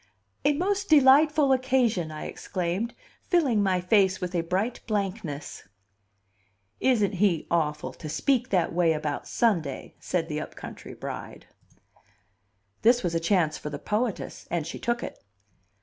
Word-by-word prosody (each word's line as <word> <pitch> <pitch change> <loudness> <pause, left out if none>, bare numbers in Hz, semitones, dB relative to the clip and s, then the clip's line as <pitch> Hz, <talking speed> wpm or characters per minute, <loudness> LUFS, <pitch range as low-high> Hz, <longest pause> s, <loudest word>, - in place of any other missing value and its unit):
"A 295 - +4
most 395 +6 -1
delightful 295 0 +6
occasion!" 250 - +1
I 155 0 -7
exclaimed, 185 +5 -3 0.3
filling 280 - +2
my 190 -2 +2
face 190 0 +3
with 180 0 -4
a 175 - +1
bright 190 +8 -1
blankness. 195 - -3 1.1
"Isn't 225 -7 +2
he 185 -4 +1
awful 150 -3 0
to 155 - -8
speak 255 - +1
that 180 -4 +1
way 170 -2 +3
about 150 -2 -3
Sunday!" 170 - 0
said 170 -3 -2
the 150 -1 -3
up - - -8
country - - -9
bride. - - -7 1.4
This 240 +1 +4
was 175 -2 -1
a 165 - +1
chance 165 -2 +1
for 150 - -5
the 145 - -5
poetess, 215 - -3
and 170 -3 -1
she 165 - -6
took 235 0 -1
it. - - -8
195 Hz, 145 wpm, -27 LUFS, 165-245 Hz, 1.4 s, delightful